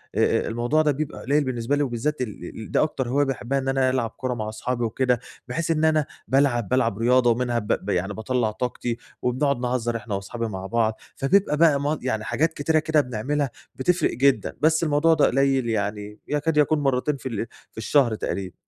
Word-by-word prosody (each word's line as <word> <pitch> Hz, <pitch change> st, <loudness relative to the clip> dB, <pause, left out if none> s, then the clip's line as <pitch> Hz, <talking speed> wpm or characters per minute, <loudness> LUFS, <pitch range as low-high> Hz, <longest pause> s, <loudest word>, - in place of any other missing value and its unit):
آآ، -, -, +2 dB
آآ -, -, -4 dB
الموضوع 120 Hz, +7 st, +1 dB
ده 150 Hz, -1 st, +3 dB
بيبقى 150 Hz, +2 st, -4 dB
قليّل 145 Hz, +3 st, +2 dB
بالنسبة 125 Hz, +1 st, -1 dB
لي 145 Hz, -, +1 dB
وبالذات 130 Hz, +3 st, -2 dB
ال 105 Hz, -7 st, -5 dB, 0.2 s
ال 110 Hz, -, -8 dB
ده -, -, +3 dB
أكتر 130 Hz, -5 st, -2 dB
هواية 145 Hz, +3 st, +2 dB
باحبّها 135 Hz, 0 st, -1 dB
إن 135 Hz, -, -4 dB
أنا 135 Hz, -1 st, +2 dB
ألعب 125 Hz, -3 st, 0 dB
كورة 130 Hz, +2 st, -4 dB
مع 110 Hz, -2 st, -4 dB
اصحابي 120 Hz, +2 st, -3 dB
وكده، 125 Hz, +2 st, +1 dB, 0.3 s
بحيث 165 Hz, 0 st, -2 dB
إن 160 Hz, 0 st, +2 dB
أنا 155 Hz, -2 st, +3 dB, 0.2 s
بالعب 130 Hz, -6 st, +2 dB
بالعب 115 Hz, -5 st, +1 dB
رياضة 120 Hz, +2 st, +4 dB
ومنها 120 Hz, 0 st, 0 dB
ب 105 Hz, -, -8 dB, 0.2 s
ب -, -, -4 dB
يعني 95 Hz, +2 st, 0 dB
باطلّع 110 Hz, 0 st, -1 dB
طاقتي 120 Hz, 0 st, -3 dB, 0.2 s
وبنقعُد 130 Hz, +1 st, +1 dB
نهزّر 120 Hz, -2 st, -1 dB
إحنا 105 Hz, -2 st, -5 dB
واصحابي 115 Hz, +4 st, -4 dB
مع 95 Hz, -3 st, -6 dB
بعض، 110 Hz, +1 st, +1 dB, 0.2 s
فبيبقى 150 Hz, +2 st, +2 dB, 0.2 s
م -, -, -4 dB
بقى 150 Hz, +2 st, 0 dB
يعني 110 Hz, -4 st, -2 dB
حاجات 160 Hz, +7 st, 0 dB
كتيرة 155 Hz, +2 st, +1 dB
كده 155 Hz, -1 st, +2 dB
بنعملها 135 Hz, +3 st, -2 dB, 0.3 s
بتفرق 175 Hz, +7 st, +1 dB
جدًا، 130 Hz, -3 st, +2 dB
بس 160 Hz, +1 st, +3 dB
الموضوع 155 Hz, +2 st, +3 dB
ده 155 Hz, -, +4 dB
قليّل 135 Hz, -2 st, +2 dB
يعني 105 Hz, -1 st, -3 dB
يكاد 150 Hz, +1 st, 0 dB
يكون 150 Hz, +1 st, +3 dB
مرّتين 135 Hz, +1 st, 0 dB
في -, -, -17 dB
ال 115 Hz, 0 st, -3 dB, 0.2 s
في -, -, -30 dB
الشهر 120 Hz, 0 st, +2 dB
تقريبًا. 95 Hz, -3 st, -4 dB
130 Hz, 200 wpm, -24 LUFS, 115-145 Hz, 0.3 s, رياضة